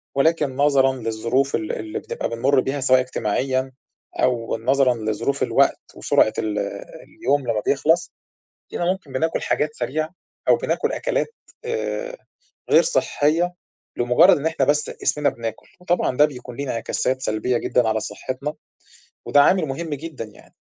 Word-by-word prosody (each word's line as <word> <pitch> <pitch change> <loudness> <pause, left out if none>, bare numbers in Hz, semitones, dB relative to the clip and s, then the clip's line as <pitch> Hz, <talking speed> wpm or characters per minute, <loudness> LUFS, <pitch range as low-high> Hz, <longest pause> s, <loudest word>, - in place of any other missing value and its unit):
ولكن 150 -2 +2
نظرًا 135 -2 +3
للظروف 115 +3 0
ال 160 0 -2
اللي 110 0 -4
بتبقى - - -4
بنمر 130 +4 +2
بيها 135 +2 -1
سواء 130 -1 +5
اجتماعيًا 130 +2 -1 0.4
أو 115 -2 0
نظرًا 130 +2 +3
لظروف 110 +5 -1
الوقت - - +3 0.2
وسرعة 110 - +2
ال 105 -1 -1 0.6
اليوم 140 0 +1
لمّا 110 -2 0
بيخلص، 165 +5 +2 0.6
تلاقينا 175 +1 0
ممكن 185 -8 -6
بناكل 160 +5 0
حاجات 150 0 -1
سريعة 155 +6 -2 0.4
أو - - +7
بناكل - - -1
أكلات - - -1 0.3
آآ - - -3 0.5
غير - - +6
صحية 175 - +1 0.4
لمجرد 120 +3 +5
إن 145 - -5
إحنا 135 -4 0
بس 145 +1 +1
اسمنا 145 +2 +2
بناكل، 115 -1 -6
وطبعًا 175 -7 0
ده 150 - +7
بيكون 125 -4 -8
ليه 140 - -3
انعكاسات 130 +2 -1
سلبية 120 +3 0
جدًا 120 -1 +1
على 110 0 +1
صحتنا، 135 +7 -5 0.7
وده 145 - +5
عامل 180 +2 +4
مُهم 155 +4 -4
جدًا 150 -5 -7
يعني، 105 - -18
135 Hz, 145 wpm, -22 LUFS, 120-155 Hz, 0.7 s, أو